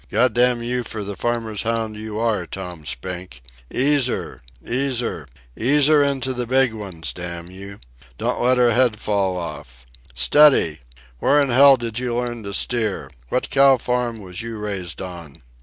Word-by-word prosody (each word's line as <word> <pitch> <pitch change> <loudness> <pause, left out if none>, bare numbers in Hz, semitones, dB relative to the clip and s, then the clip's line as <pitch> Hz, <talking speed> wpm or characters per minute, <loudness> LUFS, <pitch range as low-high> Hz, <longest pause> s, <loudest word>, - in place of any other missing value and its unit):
God 125 -2 +2
damn 120 -1 +2
you 125 +1 -1
for 110 -2 -6
the 100 0 -5
farmer's 115 -3 -2
hound 115 -1 -2
you 110 0 -6
are, 115 -1 -1
Tom 90 -5 -8
Spink! 90 -4 -6 0.3
Ease 140 0 +3
her! - - -5 0.3
Ease 130 0 +1
her! 80 - -5 0.3
Ease 140 +5 +4
her 150 0 +5
into 135 -2 0
the 125 -1 -3
big 130 -1 +3
ones, 95 -7 -6
damn 85 0 -7
you! 100 +2 -9 0.4
Don't - - -2
let 125 +1 +3
her 120 -1 +4
head 120 -2 +3
fall 100 -3 -1
off! 75 -7 -8 0.3
Steady! 80 - +4 0.4
Where 145 - +3
in 140 -2 +1
hell 135 +2 +7
did 115 -1 -4
you 125 -2 -2
learn 120 -1 -3
to 100 - -5
steer? 110 -5 0 0.2
What 130 - -2
cow 135 -1 +5
farm 120 -2 -2
was 90 +1 -7
you 115 -1 -6
raised 95 -5 -5
on?" 85 -8 -10
115 Hz, 175 wpm, -21 LUFS, 95-125 Hz, 0.4 s, hell